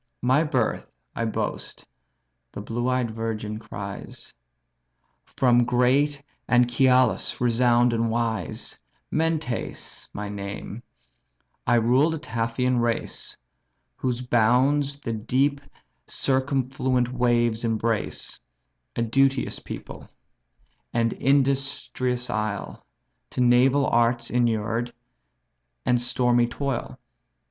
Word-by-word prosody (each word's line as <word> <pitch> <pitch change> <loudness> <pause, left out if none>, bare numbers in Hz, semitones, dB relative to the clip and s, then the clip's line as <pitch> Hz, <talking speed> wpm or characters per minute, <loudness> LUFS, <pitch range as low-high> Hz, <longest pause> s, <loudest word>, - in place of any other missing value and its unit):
"My 130 +5 +4
birth 130 - -1 0.2
I 115 - -1
boast 110 - -4 0.7
(the - - -7
blue 120 +4 -2
eyed 125 -3 0
virgin 110 -1 -4
cries) 100 -2 -8 0.9
From 120 -2 +3
great 130 +4 +2 0.3
Anchialus, 125 0 +3
renown'd 120 0 +3
and 115 0 +1
wise; 115 -1 -2 0.3
Mentes 160 -6 -2
my 105 0 -5
name; 100 +2 -6 0.9
I - - +4
rule 125 +6 +4
the 160 - -2
Taphian 120 -1 -1
race, 120 -1 -2 0.6
Whose 125 -1 -2
bounds 130 +4 +2
the 115 - -4
deep 135 +6 0 0.5
circumfluent 130 -2 0
waves 120 -2 +1
embrace; 115 -1 -1 0.6
A 115 - 0
duteous 135 +3 +1
people, - - -9 0.8
and 115 -1 +1
industrious 135 -2 0
isle, 105 -2 -3 0.5
To - - -2
naval 125 +3 +4
arts 120 0 +2
inured, 115 0 0 0.9
and 120 -1 +3
stormy 120 -1 +2
toil. 135 +1 -3
120 Hz, 95 wpm, -25 LUFS, 115-130 Hz, 0.9 s, My